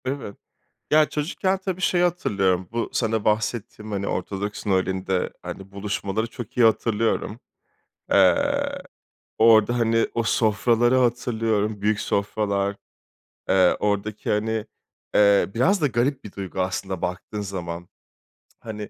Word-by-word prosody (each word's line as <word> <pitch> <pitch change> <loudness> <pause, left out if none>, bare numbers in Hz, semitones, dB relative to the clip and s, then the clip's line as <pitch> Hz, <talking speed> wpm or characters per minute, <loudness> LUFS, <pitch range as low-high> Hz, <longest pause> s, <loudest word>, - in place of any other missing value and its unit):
Evet. 130 -6 -4 0.6
Ya, 155 0 +5
çocukken 185 +5 -1
tabii 185 -1 -4
şeyi 180 -2 +2
hatırlıyorum, 95 - 0
bu 115 0 -2
sana 110 -2 0
bahsettiğim, 105 0 -1
hani, 100 0 -2
Ortodoks 100 +3 -4
Noeli'nde, 95 -1 0
hani, 95 0 -8
buluşmaları 100 +1 -2
çok 115 -1 -9
iyi 120 -2 +6
hatırlıyorum. 110 0 0 0.7
Eee, - - +3 0.6
orada, 115 +1 +5
hani, 115 -1 +2
o 115 - +1
sofraları 115 +2 +2
hatırlıyorum, 115 -4 0
büyük 105 0 +1
sofralar. 100 -1 -1 0.7
Eee, 95 -1 +4
oradaki, 105 0 -1
hani, 110 +1 0 0.5
eee 100 -1 +5
biraz 185 - +3
da 150 - +3
garip 130 +2 0
bir 105 - -9
duygu 95 -2 -5
aslında 95 0 -3
baktığın 95 +4 -4
zaman. 90 -3 -5 0.7
Hani 105 -2 -7
105 Hz, 120 wpm, -24 LUFS, 100-120 Hz, 0.7 s, iyi